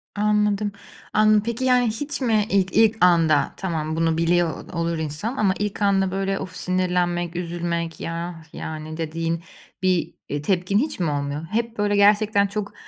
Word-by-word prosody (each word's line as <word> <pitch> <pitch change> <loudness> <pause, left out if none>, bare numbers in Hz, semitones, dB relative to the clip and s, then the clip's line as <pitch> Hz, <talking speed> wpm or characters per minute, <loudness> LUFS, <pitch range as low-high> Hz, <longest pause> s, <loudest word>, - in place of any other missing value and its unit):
Anladım. 210 0 +1 0.4
Anladım. 215 -1 +4
Peki, 235 +3 -2
yani, 250 -2 +4
hiç 285 +7 -3
mi 220 -4 +2
ilk 190 -2 +1
ilk 225 0 +5
anda 165 -4 +3
tamam 160 -4 -2
bunu 165 0 +1
biliyor 170 0 0
olur 170 0 -1
insan 160 - -4
ama 195 -3 +3
ilk 210 0 -3
anda, 195 -2 +2
böyle, 195 0 -1
of, 185 -1 -7
sinirlenmek 180 -2 0
üzülmek, 170 -1 -3
ya, 165 0 -5
yani, 155 0 -6
dediğin 165 +1 -2 0.4
bir, 185 -2 +1 0.2
eee, 145 0 -2
tepkin 185 +4 +1
hiç 290 +3 -1
mi 170 -4 +1
olmuyor? 145 +2 -3
Hep, 230 +1 -1
böyle, 205 0 +1
gerçekten 205 0 +4
çok 205 0 -4
185 Hz, 160 wpm, -23 LUFS, 165-210 Hz, 0.4 s, ilk